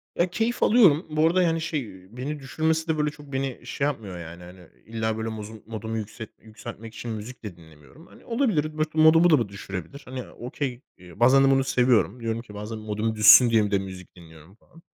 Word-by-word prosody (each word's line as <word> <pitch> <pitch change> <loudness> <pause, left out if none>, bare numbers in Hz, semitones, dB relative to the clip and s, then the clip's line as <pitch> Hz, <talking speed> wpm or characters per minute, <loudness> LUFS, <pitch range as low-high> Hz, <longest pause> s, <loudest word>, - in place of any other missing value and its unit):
Ya 175 +1 +1
keyif 225 +6 -1
alıyorum. 190 -9 +5
Bu 155 +1 +2
arada 180 +2 +2
yani 165 -1 +1
şey, 115 - -5
beni 145 +3 -4
düşürmesi 160 +4 -1
de 160 - 0
böyle, 150 0 +1
çok 145 -2 -13
beni 135 -1 -3
şey 140 - -2
yapmıyor 105 -10 -5
yani, 85 +1 -10
hani 90 -1 -14 0.2
illa 110 -1 -3
böyle 110 0 -3
mozu 110 0 -8
modumu 110 0 -5
yükset 110 +1 -7
yükseltmek 110 0 -10
için 120 - -6
müzik 110 +3 -8
de 100 -5 -7
dinlemiyorum. 80 - -18
Hani - - -19
olabilir, 210 - 0
mot 155 0 -3
modumu 160 +2 +6
da 155 - +5
bu 115 -4 -2
düşürebilir. 100 - -8
Hani 130 -1 -7
okey, 125 +1 -5 0.2
eee, 90 -2 -15
bazen 130 +3 +6
de 135 - +4
bunu 135 0 +3
seviyorum. 125 -3 +2
Diyorum 115 0 -3
ki 110 -3 -14
bazen 105 +2 -6
modum 110 +1 -3
düşsün 110 +3 +8
diye 110 -2 +3
bir 105 - -4
de 100 - +2
müzik 95 -2 -9
dinliyorum 80 +1 -16
falan. 165 +8 -21
115 Hz, 210 wpm, -25 LUFS, 105-150 Hz, 0.2 s, düşsün